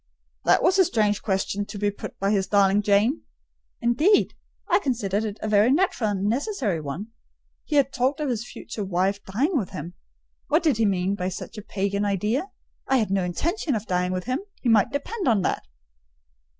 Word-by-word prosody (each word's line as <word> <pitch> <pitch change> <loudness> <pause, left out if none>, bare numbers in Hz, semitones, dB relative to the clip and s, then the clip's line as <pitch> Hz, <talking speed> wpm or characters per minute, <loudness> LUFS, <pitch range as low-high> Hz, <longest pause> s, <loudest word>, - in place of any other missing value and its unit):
"That - - +4
was 375 +2 +4
a - - +8
strange 210 -6 +1
question 195 0 -1
to 210 - -7
be 205 0 0
put 205 - -9
by 195 +1 0
his 195 -2 +1
darling 200 0 +4
Jane." 210 +7 +2 0.6
"Indeed! 295 - +3 0.3
I - - +4
considered 220 - -1
it 210 -1 -4
a - - -1
very 215 +3 +4
natural 285 - +1
and 195 -2 -2
necessary 225 - -1
one: 155 +9 -5 0.6
he 305 - -2
had 275 -1 +3
talked 260 +5 0
of 300 - -1
his 235 -4 -1
future 210 - -6
wife 190 +2 0
dying 270 - 0
with 220 -10 0
him. 175 -2 -7 0.5
What 315 +4 +2
did 305 -9 +3
he 225 - +2
mean 190 0 0
by 185 -2 -2
such 185 - -7
a - - -7
pagan 200 0 -2
idea? 210 - 0 0.4
I 270 - +3
had 215 -5 0
no 195 -1 +1
intention 295 - -1
of 215 0 -3
dying 180 -2 0
with 185 0 -2
him—he 270 - -3
might 215 -3 +4
depend 365 +9 -3
on 215 -6 +3
that." - - -1
210 Hz, 190 wpm, -25 LUFS, 195-270 Hz, 0.6 s, a